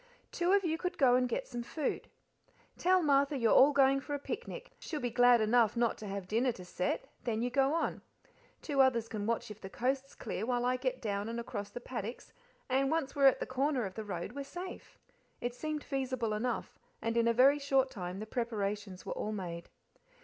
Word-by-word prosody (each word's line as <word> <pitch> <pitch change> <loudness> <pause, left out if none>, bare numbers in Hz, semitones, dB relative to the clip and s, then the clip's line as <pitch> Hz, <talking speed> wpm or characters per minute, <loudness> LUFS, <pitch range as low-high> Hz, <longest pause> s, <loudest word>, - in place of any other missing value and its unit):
"Two 350 +1 +1
of 400 0 +4
you 325 -2 -1
could 360 0 -3
go 260 -4 +5
and 250 0 +3
get - - -2
some 240 -1 -5
food. 280 +4 -3 0.7
Tell 370 0 +3
Martha 280 -1 +3
you 230 -3 +2
are - - +6
all 275 +3 +8
going 275 -1 +4
for 290 +2 -4
a - - -4
picnic - - -6
she'll 310 - -4
be 245 -3 -2
glad 245 0 +6
enough 220 0 +3
not 235 -1 +2
to 215 - -7
have 195 -2 -5
dinner 235 +5 +2
to 180 - -10
set 180 +1 -2 0.2
then 230 -2 -1
you 245 - -1
go 275 +3 +3
on. 335 - -1 0.6
Two 280 -3 +2
others 235 -4 +3
can 210 -2 -4
watch 230 -2 -1
if 210 - -11
the 190 - -7
coast's 265 +5 -2
clear 210 -3 -4
while 245 +1 0
I 250 +1 +2
get 255 -1 -2
down 205 0 -2
and 235 +1 -3
across 205 -3 -5
the 245 - -7
paddocks, 240 -2 -6 0.3
and 270 +1 +2
once 315 -3 -1
we're 280 -1 +6
at 265 - +4
the - - -2
corner 265 -1 0
of 190 - -5
the 220 - -5
road 185 -2 -4
we're 280 +2 -5
safe." 360 +6 -8 0.4
It 240 0 -3
seemed 305 +3 -4
feasible 260 -5 -2
enough, 230 +3 -3 0.2
and 230 0 -2
in 235 0 +3
a - - +5
very 265 +5 +5
short 270 -2 +2
time 180 -3 -5
the 215 - -5
preparations 210 -5 -3
were - - -3
all 215 - -3
made. 175 -5 -5
245 Hz, 220 wpm, -32 LUFS, 215-275 Hz, 0.7 s, all